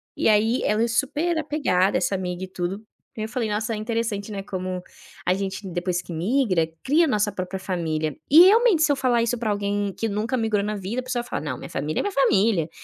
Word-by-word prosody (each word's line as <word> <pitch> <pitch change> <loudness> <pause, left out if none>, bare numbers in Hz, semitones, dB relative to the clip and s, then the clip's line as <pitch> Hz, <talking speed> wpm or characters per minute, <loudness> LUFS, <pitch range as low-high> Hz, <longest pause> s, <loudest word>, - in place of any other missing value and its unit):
E - - +2
aí 220 +3 +3
ela 210 +1 +1
é 235 - +2
super 290 +8 0
apegada, 280 -12 +1
essa 195 - 0
amiga, 180 -1 -4
e - - -13
tudo. 185 +1 -3 0.4
E - - -6
ai - - -1
eu - - -7
falei: 230 -2 -2
"Nossa, 215 +2 -1
é - - -1
interessante, 220 -2 -2
né, 200 -1 -4
como 185 -1 -4 0.4
a 180 - +3
gente 195 +1 -4
depois 175 0 -2
que 175 -1 -9
imigra, 185 0 +1 0.2
cria 305 +5 +4
a - - +3
nossa 210 -3 +1
própria 190 0 -4
família", 160 -5 -2
e 305 - +8
realmente, 430 -3 +5
se 310 - +3
eu - - +3
falar 255 -3 +2
isso 235 +1 0
pra 225 -2 -2
alguém 205 -1 -1
que 225 - -1
nunca 220 +4 -1
imigrou 220 -3 0
na 210 +1 -2
vida, 205 +6 -3
a - - -13
pessoa 255 -1 -2
fala: 240 - -4
"Não, 135 -5 -3
minha - - -9
família 150 +3 -2
é - - 0
minha 405 - -2
família!", 200 - +2
210 Hz, 240 wpm, -24 LUFS, 185-240 Hz, 0.4 s, e